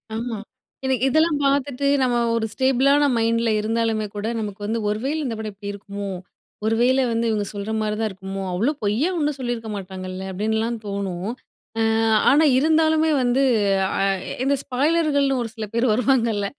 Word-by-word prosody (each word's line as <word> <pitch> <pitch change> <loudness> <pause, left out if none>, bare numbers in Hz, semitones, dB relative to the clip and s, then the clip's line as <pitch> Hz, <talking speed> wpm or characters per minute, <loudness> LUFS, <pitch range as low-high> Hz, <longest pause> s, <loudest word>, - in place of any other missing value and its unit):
ஆமா. 230 0 -3 0.5
இத 265 - +1 0.2
இதெல்லாம் 315 +2 +3
பாத்துட்டு 280 0 +1
நம்ம 245 -2 +2 0.2
ஒரு 230 -1 0
ஸ்டேபிள்ளான 270 +4 +3
மைண்டுல 230 0 +1
இருந்தாலுமே 220 0 0
கூட, 205 +1 -3
நமக்கு 205 -2 -5
வந்து, 225 +2 -1
"ஒரு 210 +1 -1
வேல 300 +3 0
இந்த 230 -4 -2
படம் 215 -1 -5
இப்படி 200 +1 -6
இருக்குமோ! 200 0 -6 0.6
ஒரு 225 +1 +2
வேல 260 +2 +4
வந்து 230 +1 0
இவுங்க 210 -2 0
சொல்ற 205 +1 -4
மாரி 210 0 -1
தான் 220 -1 0
இருக்குமோ! 195 0 -6
அவுங்களும் 240 +12 0
பொய்யா 225 - +1
ஒண்ணும் 295 -3 0
சொல்லிருக்க 240 -3 -3
மாட்டாங்கல்ல!" 185 0 -6
அப்படின்லாம் 220 +4 -1
தோணும். 200 -1 -3 0.5
ஆ - - +2 0.5
ஆனா 295 +3 +5
இருந்தாலுமே 315 +1 +3
வந்து 245 +2 +2 0.5
அ - - -3 0.3
எ - - -3
இந்த 280 +1 +2
ஸ்பாய்லர்கள்ன்னு 285 0 +1
ஒரு 225 - -5
சில 220 - -4
பேர் 235 0 +2
வருவாங்கல்ல, 230 -4 +1
230 Hz, 165 wpm, -22 LUFS, 210-275 Hz, 0.6 s, ஆனா